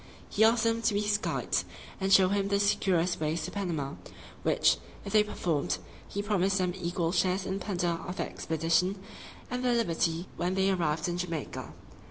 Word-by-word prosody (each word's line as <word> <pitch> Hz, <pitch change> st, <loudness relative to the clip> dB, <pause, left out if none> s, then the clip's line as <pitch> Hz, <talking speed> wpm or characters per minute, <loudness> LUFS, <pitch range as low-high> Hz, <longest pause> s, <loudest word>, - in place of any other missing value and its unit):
He 215 Hz, -, +2 dB
asked 225 Hz, +1 st, +5 dB
them 230 Hz, 0 st, +1 dB
to 220 Hz, -2 st, +1 dB
be 205 Hz, -, +2 dB
his 210 Hz, 0 st, +1 dB
guides, -, -, -1 dB, 0.4 s
and 195 Hz, 0 st, 0 dB
show 190 Hz, -1 st, +7 dB
him 200 Hz, 0 st, +1 dB
the 200 Hz, 0 st, +1 dB
securest 185 Hz, -3 st, +2 dB
ways 155 Hz, +1 st, -1 dB
to 180 Hz, -, -5 dB
Panama, 165 Hz, -9 st, -2 dB, 0.5 s
which, -, -, +3 dB, 0.3 s
if 200 Hz, -, -5 dB
they 215 Hz, -1 st, +6 dB
performed, 170 Hz, -8 st, -1 dB, 0.3 s
he 200 Hz, -, -3 dB
promised 195 Hz, -2 st, +1 dB
them 180 Hz, -2 st, 0 dB
equal 175 Hz, -2 st, -1 dB
shares 185 Hz, +1 st, +1 dB
in 190 Hz, +1 st, -2 dB
the -, -, -7 dB
plunder 180 Hz, -4 st, 0 dB, 0.2 s
of 180 Hz, -, -4 dB
that -, -, -2 dB
expedition, 165 Hz, +4 st, 0 dB, 0.5 s
and 250 Hz, 0 st, -2 dB
their 245 Hz, -1 st, +3 dB
liberty 170 Hz, -5 st, 0 dB
when 180 Hz, +2 st, 0 dB
they 190 Hz, 0 st, +3 dB
arrived 165 Hz, -4 st, 0 dB
in 175 Hz, 0 st, -2 dB
Jamaica. 165 Hz, -5 st, -4 dB
185 Hz, 190 wpm, -29 LUFS, 170-200 Hz, 0.5 s, show